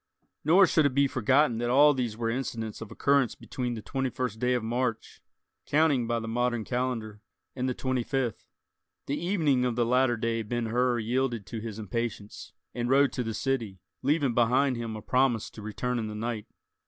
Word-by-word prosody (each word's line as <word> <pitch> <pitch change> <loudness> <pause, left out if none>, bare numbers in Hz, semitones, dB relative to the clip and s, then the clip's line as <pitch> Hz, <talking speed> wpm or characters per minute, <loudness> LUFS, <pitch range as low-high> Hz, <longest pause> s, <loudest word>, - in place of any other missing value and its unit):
Nor 180 +6 +6
should 155 -3 +3
it 130 - -5
be 140 0 +4
forgotten 130 -1 +2
that 120 0 -1
all 145 +4 +6
these 120 -5 -2
were 115 -1 -2
incidents 115 -3 -3
of 115 - -7
occurrence 140 -3 +2
between 125 -3 -4
the 110 - -7
twenty 135 -1 -2
first 125 -3 -3
day 125 +1 +2
of 120 - -1
March—counting 125 +3 -1
by 120 0 0
the 115 - -6
modern 120 0 0
calendar—and 125 +1 -4
the 125 - -2
twenty 130 -1 -1
fifth. 120 -2 -2 0.6
The 145 +4 -3
evening 155 -9 +2
of 125 -2 0
the 120 0 +2
latter 125 0 +2
day 115 0 -1
Ben 120 +2 -2
Hur 120 +2 +1
yielded 120 -1 -1
to 115 +3 -6
his 110 -1 -6
impatience, 110 0 -5 0.2
and 120 0 -2
rode 140 +1 +4
to 125 - -2
the 115 -2 -3
city, 115 -7 -2 0.2
leaving 140 -2 +1
behind 125 +3 +3
him 115 -2 -4
a 105 - -8
promise 125 -4 +1
to 110 - -10
return 120 +4 -2
in 110 - -3
the 105 - -6
night. 110 -1 -4
120 Hz, 190 wpm, -28 LUFS, 115-130 Hz, 0.6 s, Nor